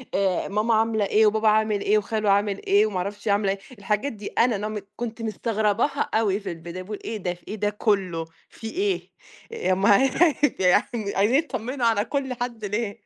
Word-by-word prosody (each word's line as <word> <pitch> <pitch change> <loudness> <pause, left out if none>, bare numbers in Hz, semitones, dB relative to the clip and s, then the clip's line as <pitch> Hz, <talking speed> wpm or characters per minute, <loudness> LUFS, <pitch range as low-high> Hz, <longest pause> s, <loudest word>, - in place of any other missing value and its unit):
آآ، 190 -2 +1
ماما 210 +3 +1
عاملة 220 -1 +2
إيه 215 +2 +4
وبابا 220 +1 +2
عامِل 215 -1 +3
إيه 210 - +3
وخالو 215 0 -1
عامل 200 0 +1
إيه 205 +2 +4
وما 210 -3 -3
اعرفش 205 +4 -4
عاملة 200 -1 +2
إيه، 195 - -4 0.2
الحاجات 210 +7 -1
دي 210 -2 -8
أنا 235 -1 +2
no 215 -1 -4
م - - -14
كنت 235 -1 -5
مستغرباها 220 +4 0
أوي 210 -3 +2
في 195 -4 -5
البداية، 170 +2 -7
باقول 205 +2 -7
إيه 220 - -3
ده، 180 -3 -3
ف 175 - -19
إيه 210 - -4
ده 205 -1 0
كُلّه، 195 -6 0 0.2
فيه 225 -1 -8
إيه؟! 390 +1 -1 0.4
يا 450 - 0
ام 190 +2 0 0.7
يعني، 200 +3 +1
عايزين 210 +6 +3
يطمنوا 255 -4 -2
على 220 -2 +2
كل 270 -2 -2
حد 240 -3 -5
ليه. 205 +1 -3
210 Hz, 195 wpm, -24 LUFS, 200-225 Hz, 0.7 s, إيه